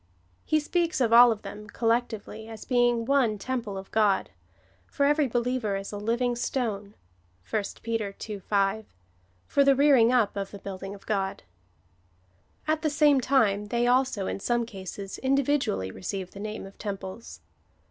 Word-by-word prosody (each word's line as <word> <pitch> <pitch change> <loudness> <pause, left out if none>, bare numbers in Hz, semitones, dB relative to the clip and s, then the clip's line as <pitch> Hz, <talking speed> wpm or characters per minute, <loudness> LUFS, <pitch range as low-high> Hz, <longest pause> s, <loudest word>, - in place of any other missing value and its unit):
He 310 - +2
speaks 340 +2 0
of 230 -3 +2
all 240 0 +9
of 220 -1 -4
them 205 +1 -8
collectively 225 -2 -1
as 225 -1 -9
being 240 -2 +2
one 250 -5 +2
temple 220 -2 -4
of 190 0 -9
God; 210 - +2 0.6
for 280 - 0
every 295 0 +3
be 240 - -1
liever 240 -4 -1
is 195 - -7
a 205 - -5
living 240 +4 0
stone, 215 -5 -3 0.5
(1 215 - 0 0.2
Peter 225 -3 -2
ii. 210 -2 -5
5,) 200 - -1 0.5
for 280 - +3
the 275 0 +5
rearing 265 -4 +5
up 245 -5 +2
of 195 -1 -3
the 200 - -9
building 195 0 -7
of 200 - -16
God. 195 -3 -2 1.2
At 310 0 +1
the 310 - +1
same 290 -2 +4
time 210 -6 +2
they 235 +3 0
also, 250 -5 +2
in - - -3
some 240 +3 0
cases, 195 -2 -7
individually 265 - +1
receive 185 - -5
the 200 - -11
name 215 0 -5
of 195 - -14
temples. 200 +1 -7
225 Hz, 165 wpm, -27 LUFS, 200-255 Hz, 1.2 s, all